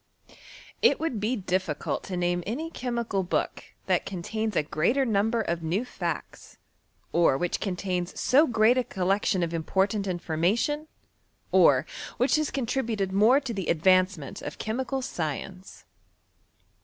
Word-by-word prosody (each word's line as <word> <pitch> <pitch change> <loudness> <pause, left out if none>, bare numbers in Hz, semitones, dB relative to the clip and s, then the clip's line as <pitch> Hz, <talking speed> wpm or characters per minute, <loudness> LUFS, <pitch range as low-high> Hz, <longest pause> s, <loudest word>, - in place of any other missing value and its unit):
It - - +4
would 315 -9 -2
be 220 +5 0
difficult 185 -6 -2
to 185 - -4
name 175 0 0
any 310 +10 -3
chemical 235 -7 -2
book 180 - -2 0.2
that - - +1
contains 210 +3 -3
a 155 - +2
greater 205 - +1
number 225 +1 +1
of 170 -5 -2
mem 175 +9 -1
fiEicts, - - -5 0.5
or 165 -6 +3
which 175 +4 -1
contains 180 -2 -3
so 290 +5 +4
great 230 +2 +4
a - - +1
collection 190 -2 0
of 170 0 -2
important 195 +5 0
information, 185 - 0 0.6
or - - +5 0.3
which 265 +5 +3
has 305 -2 0
contributed 230 -6 -1
more 220 +7 +5
to 260 -4 -4
the 195 -4 -4
advancenient 185 -2 +2
of - - -6
chemical 260 +4 -2
science. 180 - -5
200 Hz, 135 wpm, -27 LUFS, 175-240 Hz, 0.6 s, or